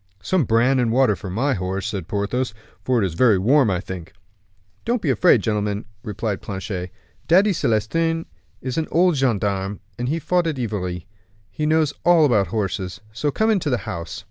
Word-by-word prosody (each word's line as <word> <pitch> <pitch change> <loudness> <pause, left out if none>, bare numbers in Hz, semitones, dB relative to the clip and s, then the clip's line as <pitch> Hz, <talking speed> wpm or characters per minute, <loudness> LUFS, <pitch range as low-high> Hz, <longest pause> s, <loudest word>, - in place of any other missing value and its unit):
"Some 185 - +1
bran 120 +4 +3
and 120 -2 +1
water 125 -3 +3
for 95 - -8
my 130 +9 0
horse," 95 0 -3
said 100 -6 -4
Porthos, 105 +4 -2 0.3
"for 125 -2 +2
it 100 - +2
is 90 - -3
very 110 +3 +4
warm, 125 +6 +4
I 90 -2 0
think." 90 -3 -8 0.7
"Don't 240 +1 0
be 155 -9 0
afraid, 120 - +4
gentlemen," 105 -1 -1 0.2
replied 105 -1 -3
Planchet; 95 -2 -5 0.4
"Daddy 190 +5 +5
Celestin 165 +7 0 0.4
is 130 +4 -2
an 160 - -2
old 175 0 +3
gendarme, 100 -6 0 0.2
who 135 +7 -1
fought 175 +2 +1
at 155 -4 -2
Ivry. 90 -8 -3 0.5
He 150 +8 -2
knows 155 -2 +2
all 175 -3 +5
about 105 -8 +3
horses; 95 -2 -3
so 145 +6 -1
come 220 +10 +1
into 190 -8 +1
the 125 - +1
house." 95 0 -5
115 Hz, 175 wpm, -22 LUFS, 100-150 Hz, 0.7 s, Daddy